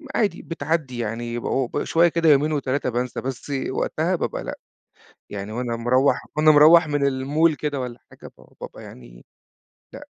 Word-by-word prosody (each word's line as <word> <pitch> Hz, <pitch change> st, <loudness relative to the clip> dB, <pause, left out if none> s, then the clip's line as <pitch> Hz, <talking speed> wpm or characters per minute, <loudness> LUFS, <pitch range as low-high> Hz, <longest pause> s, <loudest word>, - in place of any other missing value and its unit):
عادي 200 Hz, -6 st, 0 dB
بتعدّي 160 Hz, -6 st, -3 dB
يعني 120 Hz, +1 st, -4 dB
بعو 130 Hz, +1 st, -1 dB
ب 145 Hz, -, -3 dB
شويّة 170 Hz, +1 st, +3 dB
كده 165 Hz, -1 st, +1 dB
يومين 150 Hz, +2 st, +4 dB
و3 140 Hz, -2 st, -1 dB
بانسى، 125 Hz, +1 st, -3 dB
بس 135 Hz, +2 st, -6 dB, 0.2 s
وقتها 160 Hz, +6 st, -1 dB
بابقى -, -, -3 dB
لأ، -, -, -6 dB, 0.7 s
يعني 100 Hz, +1 st, -6 dB
وأنا 120 Hz, 0 st, -3 dB
مروّح 130 Hz, +4 st, +1 dB
وأنا 155 Hz, 0 st, +6 dB
مروّح 160 Hz, +2 st, +7 dB
من 145 Hz, -1 st, 0 dB
المول 145 Hz, +4 st, +1 dB
كده 145 Hz, -2 st, -3 dB
والّا 125 Hz, -1 st, -6 dB
حاجة -, -, -13 dB
ب -, -, -18 dB, 0.2 s
بابقى -, -, -9 dB
يعني -, -, -14 dB, 0.7 s
لأ، -, -, -11 dB
135 Hz, 165 wpm, -22 LUFS, 120-155 Hz, 0.7 s, مروّح